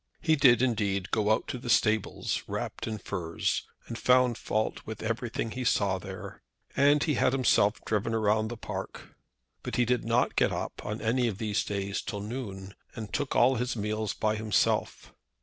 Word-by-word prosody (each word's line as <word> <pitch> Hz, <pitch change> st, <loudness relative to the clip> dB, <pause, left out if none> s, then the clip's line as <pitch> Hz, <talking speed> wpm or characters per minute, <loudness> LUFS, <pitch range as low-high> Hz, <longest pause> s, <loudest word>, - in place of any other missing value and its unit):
He 160 Hz, -1 st, +3 dB
did, 130 Hz, -4 st, +5 dB
indeed, 105 Hz, -5 st, 0 dB
go 105 Hz, -1 st, +1 dB
out 110 Hz, -, +1 dB
to 125 Hz, -, -4 dB
the 120 Hz, -, -7 dB
stables, 110 Hz, -3 st, +1 dB
wrapped -, -, -4 dB
up 110 Hz, -, -2 dB
in -, -, -4 dB
furs, 85 Hz, -4 st, -2 dB, 0.2 s
and 115 Hz, -, -6 dB
found 125 Hz, -1 st, +4 dB
fault 110 Hz, 0 st, -2 dB
with 110 Hz, 0 st, -7 dB
everything 115 Hz, 0 st, -2 dB
he 125 Hz, +2 st, -4 dB
saw 100 Hz, -5 st, +2 dB
there. 95 Hz, +1 st, -8 dB, 0.3 s
And 145 Hz, +1 st, +4 dB
he 155 Hz, -, +1 dB
had 125 Hz, -, +2 dB
himself 115 Hz, -5 st, +3 dB
driven 110 Hz, +1 st, 0 dB
round 110 Hz, 0 st, +2 dB
the 120 Hz, -, -6 dB
park. -, -, -7 dB, 0.5 s
But -, -, -4 dB
he 125 Hz, -, +3 dB
did 125 Hz, 0 st, +1 dB
not 115 Hz, +2 st, +1 dB
get -, -, +3 dB
up -, -, -4 dB
on 105 Hz, +1 st, -4 dB
any 120 Hz, +2 st, +1 dB
of 105 Hz, -5 st, -3 dB
these 105 Hz, -2 st, 0 dB
days 100 Hz, 0 st, -3 dB
till 105 Hz, -3 st, -5 dB
noon, 100 Hz, -4 st, -6 dB, 0.2 s
and 110 Hz, -2 st, -7 dB
took 145 Hz, -, -1 dB
all 125 Hz, +2 st, +4 dB
his 125 Hz, +2 st, -1 dB
meals 110 Hz, 0 st, -2 dB
by 110 Hz, 0 st, 0 dB
himself. 110 Hz, -1 st, 0 dB
110 Hz, 185 wpm, -29 LUFS, 105-125 Hz, 0.5 s, did